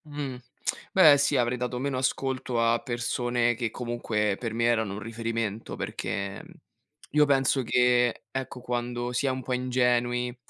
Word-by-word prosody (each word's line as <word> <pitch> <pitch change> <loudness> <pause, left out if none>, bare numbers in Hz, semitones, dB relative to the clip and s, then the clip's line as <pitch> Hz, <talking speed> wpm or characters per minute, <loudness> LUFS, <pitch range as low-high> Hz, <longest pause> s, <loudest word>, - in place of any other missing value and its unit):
Mh, 145 -3 -5 0.6
beh 160 -6 +8
sì 145 0 +2
avrei 120 +1 +1
dato 125 0 -3
meno 135 +1 -2
ascolto 130 -1 -1
a 115 0 +3
persone 120 0 0
che 115 0 -2
comunque 110 -3 -1
per 115 -3 -3
me 115 - 0
erano 110 -4 +2
un 100 - -5
riferimento, 115 -1 -3
perché 100 0 -4 0.7
io 150 0 +6
penso 135 -1 +2
che, 125 0 +2
ecco, 130 -1 -5
quando 120 0 -3
si 125 +3 0
è - - +3
un 130 0 -3
po' 130 - -2
ingenui, 125 -1 +1
120 Hz, 155 wpm, -27 LUFS, 115-130 Hz, 0.7 s, beh